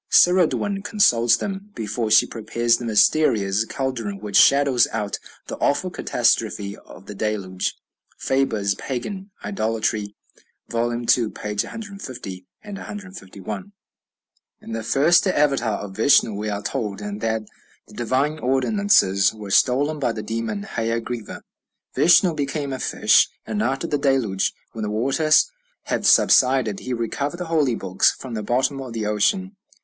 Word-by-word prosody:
"Ceridwen 185 +3 +3
consults 120 - +3
them 195 - -5
before 110 +1 -3
she 110 0 +6
prepares 115 +1 0
the 120 - -7
mysterious 110 -3 +2
caldron 120 -6 -4
which 105 -1 -6
shadows 140 -3 +5
out 105 -2 -3 0.3
the - - -6
awful 180 +6 0
catastrophe 110 - 0
of 95 - -15
the 105 - -8
Deluge." 100 -3 -3 0.4
(Faber's 115 -7 0
"Pagan 190 - -5 0.2
Idolatry," 110 - -2 0.5
vol. 120 0 -1
ii., 120 0 -4
pp. 105 -3 0
150, 130 - -8 0.2
151.) 195 - -8 0.9
In - - -11
the 115 0 -3
first 155 - +3
Avatar 140 - +1
of 95 -2 -8
Vishnu 115 -1 +4
we 105 +1 -4
are 105 0 -4
told 105 -7 -3
that 105 +2 -3 0.4
"the - - -17
divine 135 +6 -1
ordinances 130 - +2
were 105 -2 -8
stolen 145 +8 +2
by 125 -4 0
the 110 -1 -6
demon 110 -2 -3
Haya 115 +2 -2
Griva. 115 -1 -7 0.5
Vishnu 175 +1 +5
became 140 -1 -3
a 130 - -5
fish; 110 +2 +3 0.2
and 210 - -2
after 135 -9 -1
the 145 - -1
Deluge, 130 -9 +1 0.2
when 115 - -7
the 105 - -2
waters 135 - +2 0.3
had - - -1
subsided, 125 -6 +4
he 130 - -6
recovered 135 +7 -3
the 180 - -5
holy 145 -7 +2
books 95 -2 +2
from 130 -3 -9
the 110 - -3
bottom 130 +5 0
of 130 -3 -8
the 110 -2 -3
ocean." 190 - 0
120 Hz, 140 wpm, -22 LUFS, 105-145 Hz, 0.9 s, she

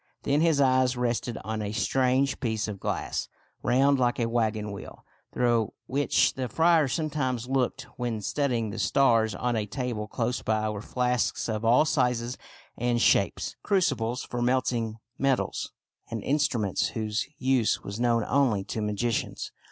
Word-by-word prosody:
Then 145 +2 +2
his 160 -3 +3
eyes 130 -2 +3
rested 120 -1 -1
on 110 +2 -3
a 105 -1 -3
strange 130 +4 +1
piece 110 -4 -1
of 105 -2 -6
glass, - - -3 0.3
round 135 +3 +3
like 120 -1 +1
a 120 - +2
wagon 110 -3 -1
wheel, 100 - -10 0.3
through 120 -3 +1
which 140 +4 +2
the 130 -2 -3
friar 165 -2 +4
sometimes 130 -5 -2
looked 130 0 0
when 120 -3 -2
studying 120 -2 -1
the 110 - -6
stars. 115 -4 +3
On 120 +5 -1
a 105 -2 -1
table 120 -3 -3
close 120 +2 -2
by 110 0 0
were 100 -1 -5
flasks 125 +1 0
of 110 -1 -2
all 120 +6 +5
sizes 125 -5 0 0.4
and 120 0 0
shapes, 100 -5 +2
crucibles 135 - 0
for 120 - -4
melting 120 -3 0 0.2
metals, 135 -2 0 0.4
and 115 -2 -4
instruments 125 -8 +1
whose 110 -1 -1
use 130 -3 +1
was 100 +3 -6
known 120 -2 +2
only 125 -8 +2
to 110 - -4
magicians. 105 +2 -2
120 Hz, 150 wpm, -27 LUFS, 110-130 Hz, 0.4 s, all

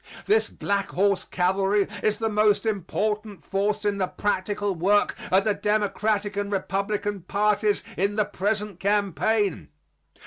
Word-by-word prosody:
This 435 +2 +3
Black 200 -1 -2
Horse 200 +1 +1
Cavalry 195 +2 +1
is 215 -1 +1
the 225 - -1
most 210 0 +2
important 210 0 -2
force 205 +2 -1
in 200 -1 0
the 185 - +1
practical 205 0 -1
work 195 +4 +2 0.2
of 190 +1 +5
the 215 - +2
Democratic 210 0 0
and 205 0 -2
Republican 200 +1 -2
parties 210 +3 +1
in 200 +2 +1
the 215 -1 +2
present 205 -1 -2
campaign. 200 - 0
205 Hz, 135 wpm, -25 LUFS, 195-210 Hz, 0.2 s, of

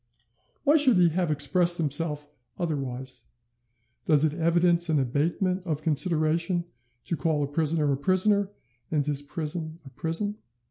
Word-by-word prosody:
Why 300 +2 +4
should 260 -8 +5
he 175 -1 +4
have 175 +1 -1
expressed 160 +4 +3
himself 150 -1 +2 0.3
otherwise? 135 -6 -5 0.8
Does 150 -1 +3
it 150 - -1
evidence 170 +1 +2
an 155 -2 +2
abatement 170 +8 -1
of 155 -2 -3
consideration 165 +2 +1 0.4
to 170 - -2
call 155 -2 -1
a - - -2
prisoner 150 0 0
a - - -2
prisoner, 190 +5 +1 0.4
and 150 -3 -1
his 145 -1 -1
prison 155 +2 -5
a 135 - -12
prison? 165 - -3
160 Hz, 140 wpm, -26 LUFS, 145-175 Hz, 0.8 s, should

